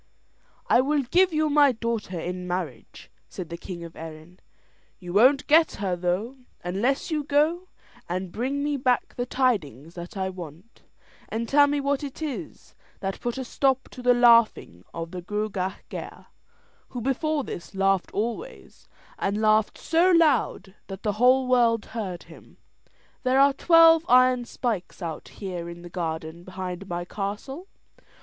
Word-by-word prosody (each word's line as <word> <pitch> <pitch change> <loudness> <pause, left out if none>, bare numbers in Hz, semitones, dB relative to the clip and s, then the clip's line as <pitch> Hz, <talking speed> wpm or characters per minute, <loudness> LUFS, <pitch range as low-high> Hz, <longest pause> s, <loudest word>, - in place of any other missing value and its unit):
"I 245 - +5
will 285 +1 +1
give 360 +8 +3
you 310 -1 +1
my 290 -2 +5
daughter 225 -6 -3
in 180 +2 -5
marriage," 170 -10 -6 0.2
said 180 -3 -7
the 170 - -5
king 170 -1 -8
of 165 -1 -10
Erin; 160 +3 -10 0.6
"you 175 -2 -8
won't 255 +7 +5
get 320 +2 +5
her, 190 -3 -2
though, 180 +9 -2 0.3
unless 225 - -1
you 305 -2 0
go 305 +6 +1 0.4
and 180 +1 -3
bring 270 +7 -2
me 290 -1 0
back 250 -2 0
the 245 0 -3
tidings 170 - -1
that 175 +4 -9
I 190 0 -1
want, 175 +3 -11 0.5
and 230 +1 -3
tell 285 +2 +5
me 290 0 0
what 280 0 -1
it 280 -2 -7
is 265 - -6 0.3
that 195 -1 -4
put 240 +1 -3
a 260 - -4
stop 265 +1 0
to 250 - -10
the 245 0 +4
laughing 230 - +4
of 165 0 -6
the 180 -1 -6
Gruagach 195 -1 -3
Gaire, - - -8 0.6
who 250 - -6
before 285 +4 -1
this 175 -4 -8
laughed 195 -1 +1
always, 235 - -5 0.3
and 200 +2 -1
laughed 215 0 +2
so 335 +3 +2
loud 295 - +2
that 195 0 -8
the 210 - +1
whole 255 +1 +5
world 235 -3 +3
heard 195 -6 -5
him. - - -16 0.6
There 260 +1 +2
are 280 0 +6
twelve 330 +2 +6
iron 255 0 +5
spikes 215 -7 -4
out 165 -2 -5
here 180 -4 -6
in 170 0 -10
the 175 - -9
garden 160 -1 -4
behind 185 0 -6
my 175 0 -3
castle. 210 - -5
220 Hz, 160 wpm, -25 LUFS, 180-270 Hz, 0.6 s, are